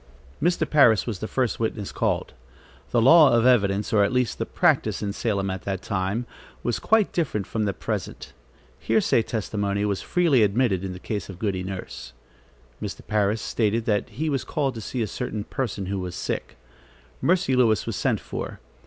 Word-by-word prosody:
Mr. 175 +2 +1
Parris 120 -8 +5
was 110 -6 -4
the 110 - -4
first 125 -1 -1
witness 110 -3 -2
called. - - -1 0.6
The 120 - +2
law 150 +3 +8
of 115 - +2
evidence, 105 -5 +3
or 105 -2 +5
at 100 - +1
least 125 -2 0
the - - -2
practice - - +1
in 100 -1 -2
Salem 100 -4 -1
at 95 -1 -5
that 95 -2 -3
time, 100 +4 -2 0.4
was 120 - -1
quite 220 -2 +3
different 135 - -1
from 110 -2 -2
the 100 - 0
present. - - -5 0.5
Hearsay - - +2
testimony 100 -2 -2
was 100 -2 -1
freely 165 -9 +2
admitted 105 -2 +2
in 95 -1 -4
the - - -8
case 105 +1 -4
of 95 - -8
Goody 95 -2 -1
Nurse. 90 -9 -7 0.7
Mr. - - -6
Parris 105 0 0
stated 110 0 0
that 105 -4 0
he 145 +10 -3
was 140 -4 0
called 140 -3 -1
to 115 - -7
see 120 +3 -3
a - - 0
certain 110 -1 -4
person 105 -5 -3
who 95 +1 -2
was 90 -1 -5
sick. - - -4 0.6
Mercy 175 -8 +2
Lewis 115 -4 +3
was - - -3
sent - - 0
for. - - -6
110 Hz, 185 wpm, -24 LUFS, 100-125 Hz, 0.7 s, law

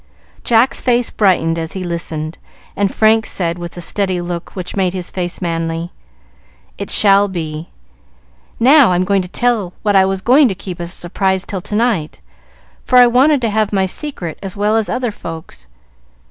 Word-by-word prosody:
Jack's 240 +4 +2
face 245 -1 +1
brightened 170 -5 +1
as 160 0 -4
he 190 - -5
listened, 165 -2 -4 0.4
and 200 -1 0
Frank 220 0 +3
said, 170 -2 -2
with 175 -1 -7
the 175 - -8
steady 190 0 -1
look 175 -1 -6
which 180 -2 -6
made 190 -2 0
his 180 -2 -4
face 175 -2 -4
manly, 165 0 -3 0.9
"It - - -5
shall 200 0 +5
be. 160 -3 -5 0.9
Now 260 -3 +6
I'll 180 +1 +1 0.2
tell 240 +7 0
you 175 - -16
what 205 -1 +1
I 190 -1 +6
was 190 0 -2
going 265 +6 +5
to 195 - -2
keep 185 -2 -7
as 170 - -5
a 175 - -6
surprise 190 +2 -1
till 190 -3 -5
to 210 - -5
night, 210 - 0 0.6
for 250 - +2
I 250 - +9
wanted 260 +4 +3
to 230 -3 0
have 215 -1 0
my 195 -2 +1
secret 190 - -5
as 195 0 -6
well 210 +2 +1
as 225 -2 +1
other 245 -2 -1
folks. 160 - -9
190 Hz, 180 wpm, -16 LUFS, 175-220 Hz, 0.9 s, I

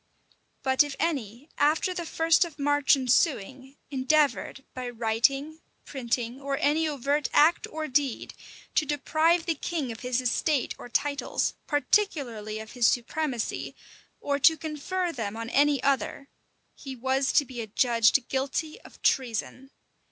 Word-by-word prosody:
But 265 +1 +3
if 290 -1 0
any, 275 -5 -2
after 305 +5 +2
the 345 -2 -5
first 325 +4 +3
of 335 -4 -8
March 290 0 +3
ensuing, 265 - 0
endeavored, 275 0 +1
by 250 -1 -5
writing, 245 +7 0 0.2
printing, 245 -1 -3
or 275 0 -2
any 310 +2 +2
overt 285 0 -1
act 315 +4 +4
or 310 0 -5
deed, 270 -2 -1 0.4
to 305 - +1
deprive 315 +4 +1
the 335 - +1
king 305 -4 -3
of 225 - -8
his 250 0 -1
estate 255 +2 0
or 245 - -9
titles, 280 +4 -1
particularly 265 - 0
of 220 0 -8
his 245 -3 +2
supremacy, 245 0 -2 0.4
or 280 0 -1
to 320 +3 +5
confer 325 +4 -3
them 225 -7 -5
on 230 +1 -5
any 285 -2 +3
other, 280 +1 -1 0.4
he 270 -3 -8
was 265 +2 0
to 290 - +4
be 250 -3 -7
adjudged 230 +3 +2
guilty 275 +4 -3
of - - -16
treason. 255 +1 -1
275 Hz, 140 wpm, -27 LUFS, 245-305 Hz, 0.4 s, to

